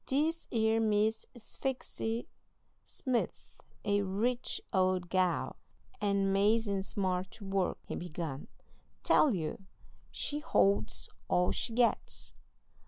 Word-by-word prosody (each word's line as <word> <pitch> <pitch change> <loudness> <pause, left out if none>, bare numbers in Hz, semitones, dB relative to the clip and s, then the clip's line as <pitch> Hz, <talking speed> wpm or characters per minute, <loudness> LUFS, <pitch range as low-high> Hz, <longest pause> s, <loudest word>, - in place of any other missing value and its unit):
"This 315 +5 +1
'ere 225 -1 +3
Miss 220 0 +2
Sphyxy 235 -1 -3 0.6
Smith's 255 -4 -3 0.3
a 205 0 +3
rich 225 +6 -1
old 185 -2 +2
gal, 185 -2 +1 0.4
and 200 -1 +2
'mazin' 205 0 +3
smart 185 -1 -1
to 205 - -10
work," 195 -2 0
he - - -4
began. 160 -5 -5 0.6
"Tell 275 -9 +5
you, 160 +1 -3 0.5
she 295 - -2
holds 105 - +2 0.2
all 180 0 +3
she 230 - -2
gets. 240 0 +1
200 Hz, 105 wpm, -32 LUFS, 185-230 Hz, 0.6 s, Tell